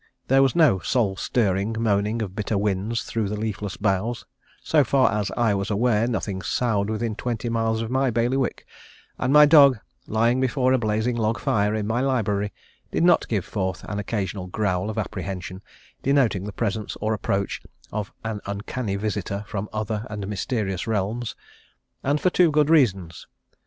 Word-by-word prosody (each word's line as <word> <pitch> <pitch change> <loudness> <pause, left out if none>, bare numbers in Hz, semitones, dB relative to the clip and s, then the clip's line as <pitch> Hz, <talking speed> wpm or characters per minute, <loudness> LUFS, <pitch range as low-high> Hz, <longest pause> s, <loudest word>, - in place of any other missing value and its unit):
There 135 +1 +5
was 135 -2 +3
no 155 - +5
soul 100 0 0
stirring 100 0 0
moaning 110 0 +1
of 95 -2 -7
bitter 105 0 -1
winds 105 +3 -1
through 110 -3 -2
the 105 0 -3
leafless 105 -2 -4
boughs; 105 +4 -1 0.4
so 150 -2 +4
far 135 0 +3
as 105 -2 -1
I 115 -3 +3
was 100 +1 -2
aware 110 +1 +2
nothing 100 -5 -2
soughed 105 -2 0
within 110 +1 -2
twenty 120 0 -3
miles 115 -1 0
of 115 - -5
my 130 0 +2
bailiwick; 120 +3 0 0.5
and 130 - 0
my 150 +1 +8
dog, 145 -4 +7 0.3
lying 115 +4 +2
before 130 0 +2
a 130 - +3
blazing 110 +2 0
log 115 0 0
fire 105 0 +1
in 105 -1 -2
my 115 +3 0
library, 105 -6 0 0.4
did - - 0
not 175 - +4
give 105 -6 -1
forth 95 -3 -3
an 105 +1 -4
occasional 100 -3 -3
growl 95 0 -1
of 110 - -5
apprehension, 95 -2 -4 0.4
denoting 125 -9 +2
the 105 - -5
presence 105 0 -3
or 110 +1 0
approach 100 -2 -2 0.3
of 105 -2 -4
an 110 -2 -4
uncanny 100 +1 -3
visitor 100 -1 -3
from 105 -1 -4
other 110 0 -3
and 105 -2 -5
mysterious 100 -2 -2
realms: 110 +2 -2 0.7
and 145 +2 +1
for 185 - +2
two 175 -2 +4
good 150 0 +2
reasons. 95 - +2
110 Hz, 170 wpm, -24 LUFS, 100-120 Hz, 0.7 s, my